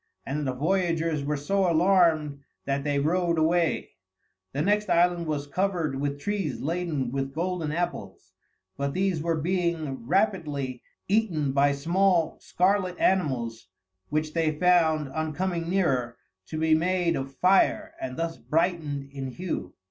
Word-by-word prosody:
and 145 +1 -2
the - - +1
voyagers 165 +1 0
were 150 +1 -1
so 190 +5 +1
alarmed 165 -4 +3 0.3
that 140 0 -1
they 145 -1 0
rowed 170 +3 +1
away. 165 +1 +1 0.6
The 145 +2 -1
next 210 +2 +1
island 175 -1 +3
was 145 -2 -2
covered 165 -4 -1
with 145 0 -2
trees 195 0 -2
laden 160 -5 -2
with 135 0 -3
golden 170 -2 -2
apples, 175 +3 -4 0.4
but 140 0 -2
these 185 -4 0
were 165 +1 0
being 165 -7 -1
rapidly 150 - 0 0.3
eaten 190 -9 +1
by 140 +1 +3
small, 170 +3 +1
scarlet 185 0 +1
animals 120 - 0 0.4
which 155 0 -1
they 160 -2 0
found, 160 -4 +3
on 155 +2 -3
coming 175 -1 -2
nearer, 130 -11 0 0.3
to 155 - -5
be 160 0 +3
all 155 - +4
made 175 -1 +1
of 135 0 -5
fire 195 - +3
and 330 - -5
thus 165 0 -2
brightened 155 -4 -1
in 135 -1 -5
hue. 130 - -5
160 Hz, 145 wpm, -26 LUFS, 140-180 Hz, 0.6 s, all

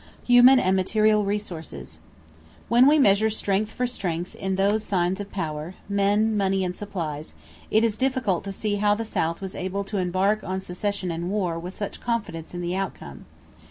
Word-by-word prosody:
=Human 245 +2 +7
and 190 -5 +2
Material 215 +2 +3
Resources.= 200 -5 -5 0.7
When 240 +3 +6
we 300 +2 +6
measure 215 -5 +4
strength 210 0 -1
for 250 - -2
strength 180 -8 -3
in 190 0 -3
those 200 +3 +1
signs 190 -1 0
of 200 - -8
power 155 -1 -4
men, 205 +2 +2
money, 195 -1 +1
and 180 0 -3
supplies 165 -8 -5 0.3
it 220 +1 +3
is 220 -2 +1
difficult 260 -8 0
to 200 - -4
see 205 +1 -2
how 205 0 +3
the 225 +1 -4
South 165 -5 -1
was 190 -1 -5
able 190 +2 -3
to 200 +1 -4
embark 190 +4 +1
on 190 +1 -3
secession 190 0 -3
and 170 +2 -3
war 185 -5 -1
with 180 +3 -8
such 205 - -5
confidence 205 -9 -3
in 175 - -4
the 175 +1 -2
outcome. 175 - -5
195 Hz, 180 wpm, -25 LUFS, 180-215 Hz, 0.7 s, =Human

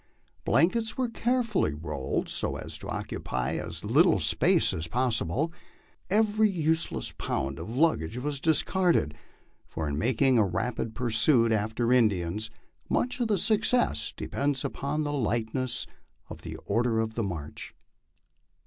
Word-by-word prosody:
Blan 170 +3 +4
kets 225 -1 -3
were 255 -2 0
carefully 230 - 0
rolled 75 -4 -3
so - - -2
as - - -7
to - - -8
occupy 60 0 -3
as - - -6
little - - +4
space - - +3
as 80 +1 -4
possible; 125 - 0 0.6
every 215 +1 +3
use 160 -3 0
less - - -5
pound 70 +4 -2
of 110 +9 -6
luggage 135 - +1
was 140 +2 -3
discarded, 165 - +2 0.5
for 80 -1 -4
in 70 0 -2
making 125 +1 +3
a - - +5
rapid 110 +4 -2
pursuit 115 0 +3
after 110 +3 +1
In 120 -4 +5
dians, 100 +3 -3 0.4
much 250 +1 0
of 240 - +1
the 210 -2 +2
success 215 - +2
depends 140 -1 -2
upon 145 +2 -2
the 145 0 -2
lightness 120 0 -1 0.5
of - - -8
the - - -7
order 115 +2 +1
of 110 0 -2
march. 80 -7 -6
125 Hz, 140 wpm, -28 LUFS, 105-165 Hz, 0.6 s, a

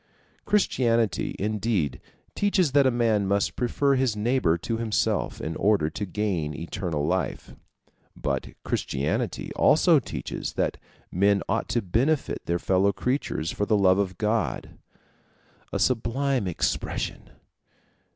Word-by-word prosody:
Christianity 115 - +1
indeed 100 - -1 0.3
teaches 190 -6 +2
that 140 -1 +5
a - - +5
man 115 -5 +1
must 100 +1 +1
prefer 140 +3 +1
his 130 -4 +1
neighbor 105 -6 +1
to 115 +6 -3
himself, 110 -2 0
in 80 +1 -4
order 100 -6 +2
to 105 +5 -4
gain 90 -7 -2
eternal 85 -3 -3
life; 90 +3 -2 0.6
but 70 -2 -2 0.2
Christianity 70 +3 -2
also - - +5
teaches - - -5
that - - -1 0.3
men 100 +2 +2
ought - - -1
to 120 - 0
benefit 130 - 0
their 85 - +1
fellow 95 +3 +2
creatures 110 - -2
for 105 - -2
the 110 - +3
love 95 -1 +4
of 95 -2 -1
God. 110 +1 -1 1.0
A - - -1
sublime 130 -1 0
expression! 85 - -2
105 Hz, 125 wpm, -26 LUFS, 90-120 Hz, 1.0 s, that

